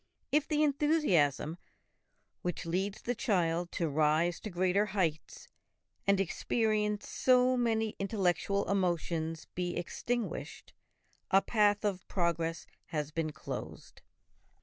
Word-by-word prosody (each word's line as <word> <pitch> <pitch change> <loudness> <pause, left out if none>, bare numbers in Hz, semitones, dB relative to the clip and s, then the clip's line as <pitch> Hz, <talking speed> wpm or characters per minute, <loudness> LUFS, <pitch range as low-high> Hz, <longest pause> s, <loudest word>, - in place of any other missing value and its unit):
If 300 +1 +2
the 305 -1 +2
enthusiasm 265 - +2 0.8
which 180 0 -3
leads 190 +5 -2
the 245 - 0
child 175 -8 0
to 170 - 0
rise 155 +3 +2
to 215 - -6
greater 185 +3 +1
heights 170 - -1 0.6
and 200 -1 +4
experience 210 +2 0
so 255 0 +3
many 225 -3 0
intellectual 200 0 0
emotions 170 -4 -1
be 175 -1 -2
extinguished, 235 +6 -4 0.6
a 195 +1 +5
path 210 -2 +2
of 190 -3 -2
progress 170 -2 -1 0.2
has 150 -2 -3
been 160 -1 -2
closed. - - -8
190 Hz, 110 wpm, -32 LUFS, 165-220 Hz, 0.8 s, a